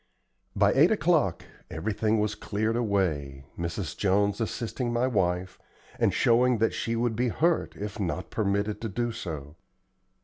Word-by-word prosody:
By -, -, +4 dB
eight -, -, +6 dB
o'clock -, -, +2 dB, 0.2 s
everything 105 Hz, +5 st, 0 dB
was 105 Hz, 0 st, 0 dB
cleared 110 Hz, +1 st, -2 dB
away, 80 Hz, -, -1 dB
Mrs. 85 Hz, 0 st, -4 dB
Jones 100 Hz, +2 st, +1 dB
assisting 120 Hz, +2 st, -2 dB
my 120 Hz, +1 st, +1 dB
wife, 95 Hz, -6 st, 0 dB, 0.4 s
and -, -, +3 dB
showing 120 Hz, +1 st, +3 dB
that 115 Hz, +1 st, +1 dB
she 115 Hz, -, -2 dB
would 115 Hz, -1 st, 0 dB
be 125 Hz, +3 st, +1 dB
hurt 165 Hz, +8 st, +1 dB
if 105 Hz, +2 st, -6 dB
not 95 Hz, -1 st, -3 dB
permitted 100 Hz, 0 st, -1 dB
to 115 Hz, -, -3 dB
do 120 Hz, +4 st, -1 dB
so. 75 Hz, -7 st, -7 dB
105 Hz, 145 wpm, -27 LUFS, 95-115 Hz, 0.4 s, eight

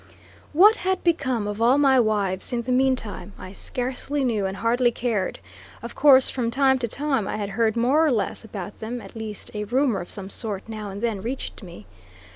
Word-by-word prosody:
What 415 Hz, +8 st, +6 dB
had 375 Hz, 0 st, -1 dB
become 260 Hz, -, 0 dB
of 205 Hz, +1 st, -4 dB
all 245 Hz, +4 st, +5 dB
my 270 Hz, -2 st, +5 dB
wives 205 Hz, -5 st, 0 dB
in 240 Hz, -1 st, -1 dB
the 250 Hz, -, -3 dB
meantime, 250 Hz, -7 st, 0 dB
I 185 Hz, -, -9 dB
scarcely 255 Hz, +6 st, -2 dB
knew 215 Hz, -6 st, 0 dB
and 190 Hz, +1 st, -5 dB
hardly 240 Hz, +2 st, +2 dB
cared. 230 Hz, -5 st, -2 dB, 0.5 s
Of -, -, -6 dB
course 265 Hz, -3 st, +6 dB
from 240 Hz, -3 st, -1 dB
time 265 Hz, +2 st, +2 dB
to 240 Hz, -, -1 dB
time 270 Hz, -4 st, -1 dB
I -, -, -3 dB
had 205 Hz, -2 st, -3 dB
heard 220 Hz, +1 st, +1 dB
more 265 Hz, +7 st, +3 dB
or 310 Hz, -, +3 dB
less 225 Hz, -2 st, -1 dB
about 200 Hz, -3 st, -8 dB
them 235 Hz, +3 st, -5 dB
at -, -, -12 dB
least, 220 Hz, -2 st, -6 dB
a 210 Hz, -1 st, -3 dB
rumor 245 Hz, -3 st, +1 dB
of 175 Hz, -, -9 dB
some 195 Hz, -1 st, -4 dB
sort 205 Hz, -4 st, -2 dB
now 215 Hz, -2 st, -6 dB
and 200 Hz, +3 st, -7 dB
then 220 Hz, -5 st, -1 dB
reached 245 Hz, +3 st, -5 dB
me. 170 Hz, -, -11 dB
230 Hz, 205 wpm, -24 LUFS, 205-265 Hz, 0.5 s, What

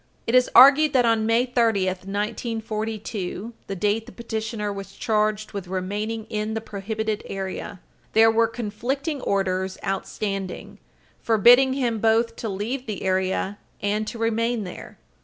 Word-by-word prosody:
It 230 Hz, -, -2 dB
is 255 Hz, 0 st, +5 dB
argued 280 Hz, +4 st, +8 dB
that, 250 Hz, -2 st, +4 dB
on 225 Hz, -1 st, +2 dB
May 230 Hz, +2 st, +3 dB
30, 230 Hz, -6 st, +2 dB
1942, 215 Hz, +1 st, -3 dB
the 195 Hz, -, -4 dB
date 210 Hz, +4 st, 0 dB
the -, -, -10 dB
petitioner 220 Hz, -2 st, -4 dB
was 195 Hz, 0 st, -8 dB
charged 215 Hz, -2 st, 0 dB
with 195 Hz, -3 st, -6 dB
remaining 205 Hz, +4 st, -3 dB
in 215 Hz, 0 st, -3 dB
the -, -, 0 dB
prohibited 215 Hz, +1 st, -3 dB
area, 190 Hz, 0 st, -5 dB, 0.3 s
there 225 Hz, +1 st, +6 dB
were 225 Hz, 0 st, +3 dB
conflicting 245 Hz, +7 st, -3 dB
orders 190 Hz, -2 st, -1 dB
outstanding, 195 Hz, 0 st, -4 dB, 0.4 s
forbidding 245 Hz, +4 st, +6 dB
him 240 Hz, -5 st, -1 dB
both 230 Hz, +1 st, +2 dB
to 225 Hz, -, -4 dB
leave 230 Hz, +7 st, -4 dB
the 210 Hz, -3 st, -4 dB
area 190 Hz, +1 st, 0 dB, 0.2 s
and 210 Hz, +1 st, -1 dB
to 235 Hz, -, -5 dB
remain 230 Hz, 0 st, 0 dB
there. 180 Hz, -, -9 dB
220 Hz, 140 wpm, -24 LUFS, 200-230 Hz, 0.4 s, argued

